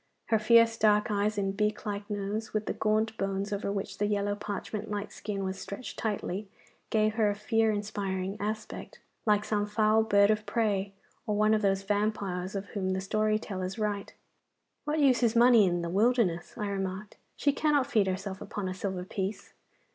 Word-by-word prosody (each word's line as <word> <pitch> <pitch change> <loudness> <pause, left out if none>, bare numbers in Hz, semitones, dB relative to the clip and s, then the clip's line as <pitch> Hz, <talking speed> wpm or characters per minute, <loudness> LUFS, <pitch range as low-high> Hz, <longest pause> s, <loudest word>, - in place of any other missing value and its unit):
Her 220 - +4
fierce 230 +1 +5
dark 210 0 +3
eyes 205 +1 0
and 195 -1 -1
beak 210 +1 -1
like 205 0 -4
nose, 210 +2 -3
with 215 0 0
the - - -2
gaunt 220 +1 +1
bones 195 +1 -1
over 200 0 -2
which 200 -1 -4
the 205 - +2
yellow 205 -1 0
parchment 205 +1 -5
like 205 0 -3
skin 200 -1 -4
was 190 0 -3
stretched 200 +5 -7
tightly, 205 -2 -3 0.4
gave 215 -1 +2
her 215 -2 +2
a 205 - -1
fear 225 +1 +1
inspiring 200 -2 -3
aspect, 215 +2 -5 0.3
like 210 0 +3
some 205 -1 0
foul 215 +1 +3
bird 205 -1 +4
of 215 0 -1
prey, 205 -4 0 0.4
or 210 - +1
one 215 +1 +4
of 215 - +2
those 195 -1 +1
vampires 200 -2 -1
of 195 0 -3
whom 190 -2 -1
the 190 - -1
story 215 +2 +1
tellers 190 -2 -5
write. 210 -2 -2 0.7
'What 300 +1 0
use 275 -5 +4
is 235 -1 +2
money 235 -3 +7
in 175 -1 0
the - - -2
wilderness?' 200 -3 +1
I 210 - -2
remarked; 195 +1 -4 0.2
'she 285 - +2
cannot 290 -2 +2
feed 220 -8 +2
herself 190 +1 -3
upon 205 -2 -4
a 185 - -2
silver 190 -1 -3
piece. 190 +2 -4
205 Hz, 185 wpm, -29 LUFS, 195-215 Hz, 0.7 s, money